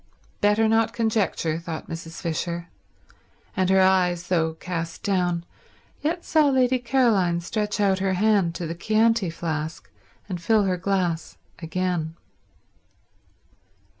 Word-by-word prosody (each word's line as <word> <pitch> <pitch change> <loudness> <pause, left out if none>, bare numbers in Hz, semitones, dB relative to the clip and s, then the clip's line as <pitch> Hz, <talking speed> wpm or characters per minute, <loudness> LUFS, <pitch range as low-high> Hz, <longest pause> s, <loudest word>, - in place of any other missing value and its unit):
Better 210 +2 +3
not 225 0 +2
conjecture, 215 -8 0
thought 165 -2 -6
Mrs. 165 +1 -7
Fisher; 170 +1 -3 0.9
and 185 -1 +1
her 190 0 +5
eyes, 180 -2 +2
though 160 -3 +1
cast 165 -1 -5
down, 180 -3 0 0.6
yet 335 +4 -2
saw 310 -3 +4
Lady 260 -1 +3
Caroline 230 -8 +2
stretch 210 +4 -2
out 195 -2 +2
her 190 0 +1
hand 195 -3 +2
to 175 - -4
the 165 - -3
Chianti 220 +2 +2
flask 160 -1 -4 0.4
and 180 -4 -5
fill 215 +4 +3
her 185 -2 0
glass 180 -3 -1 0.2
again. 165 -1 -2
185 Hz, 125 wpm, -24 LUFS, 170-215 Hz, 0.9 s, her